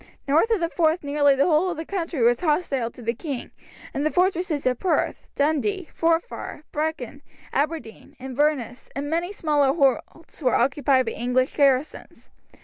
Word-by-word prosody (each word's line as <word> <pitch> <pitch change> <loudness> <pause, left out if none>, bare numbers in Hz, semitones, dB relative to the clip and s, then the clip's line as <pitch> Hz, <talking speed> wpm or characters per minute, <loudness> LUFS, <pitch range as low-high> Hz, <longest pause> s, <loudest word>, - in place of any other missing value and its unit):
North 315 +11 +3
of 450 -3 +2
the 335 - 0
Forth 325 0 +1
nearly 285 -1 +3
the 275 - +3
whole 345 +2 +3
of 345 - -4
the 320 - -5
country 335 -7 -3
was 240 +1 +3
hostile 295 -7 0
to 240 - -13
the 230 +1 0
king, 275 0 -6 0.4
and 280 - -2
the 310 - +2
fortresses 355 -4 0
of 250 -1 +1
Perth, 370 - -1
Dundee, 315 +6 0
Forfar, 330 -2 -1
Brechin, 295 -3 -3 0.3
Aberdeen, 290 -6 -3
Inverness, 260 -1 -1
and 285 +2 -4
many 340 +3 -1
smaller 295 -8 +2 0.4
holds, 325 0 -17
were 255 -3 +2
occupied 270 0 +2
by 225 - -2
English 250 +3 0
garrisons. 275 0 0
295 Hz, 160 wpm, -24 LUFS, 265-330 Hz, 0.4 s, North